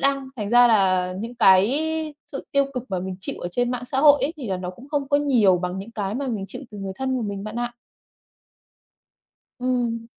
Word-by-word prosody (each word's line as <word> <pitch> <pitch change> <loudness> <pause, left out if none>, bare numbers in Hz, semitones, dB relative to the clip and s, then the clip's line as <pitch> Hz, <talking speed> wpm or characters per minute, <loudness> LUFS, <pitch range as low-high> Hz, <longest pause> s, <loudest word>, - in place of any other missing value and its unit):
đăng 275 -1 +1
thành 210 -2 -3
ra 245 +1 +7
là 185 -4 +3
những 235 +2 -6
cái 225 +7 +4 0.5
sự 275 - -5
tiêu 280 0 +4
cực 250 -1 -3
mà 185 - -1
mình 185 0 -5
chịu - - -5
ở 175 - -3
trên 245 +5 0
mạng 250 0 -3
xã 265 +2 -3
hội 290 -1 +7
ấy, 300 - 0
thì 255 -8 -6
là 190 - -1
nó 180 0 -5
cũng 245 +9 -14
không 285 -2 -2
có 285 - +4
nhiều 240 -11 +4
bằng 180 +1 -3
những 200 +4 -7
cái 205 -2 -3
mà 275 +1 -2
mình 210 -5 -3
chịu - - -8
từ 205 - -9
người 195 -1 -4
thân 260 -1 -1
của 240 - -2
mình 200 -1 -4
bạn 215 +2 -6
ạ. 240 0 -3 1.9
Ừm. 240 -2 -1
235 Hz, 230 wpm, -23 LUFS, 195-265 Hz, 1.9 s, ra